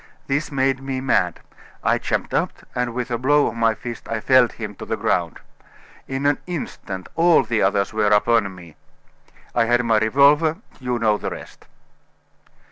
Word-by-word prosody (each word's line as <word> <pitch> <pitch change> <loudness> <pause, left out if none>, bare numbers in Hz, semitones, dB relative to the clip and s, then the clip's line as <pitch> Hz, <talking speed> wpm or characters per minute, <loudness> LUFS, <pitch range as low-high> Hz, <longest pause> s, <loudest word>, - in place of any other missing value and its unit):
This 150 +3 -1
made 135 -1 +1
me 135 -1 -3
mad. 130 0 0 0.4
I - - +2
jumped - - -2
up, - - 0 0.2
and 125 -1 -2
with 125 0 -3
a 120 - -1
blow 145 +3 +3
of - - -2
my 115 -1 +1
fist 120 0 -8
I 115 - -1
felled 130 +1 +4
him 110 -2 -6
to - - -8
the - - -2
ground. 85 -3 -1 0.7
In 135 +1 -3
an 145 -1 +2
instant 100 - -6
all 170 0 +5
the 115 -2 -1
others 100 +1 +1
were 105 -1 +1
upon 105 -1 +2
me! 85 -4 -14 0.8
I 115 - +2
had 120 +1 +2
my 110 -2 +3
revolver 145 +8 +4 0.2
you 125 -1 -2
know 110 -3 +1
the - - -3
rest." - - -11
120 Hz, 175 wpm, -21 LUFS, 110-135 Hz, 0.8 s, all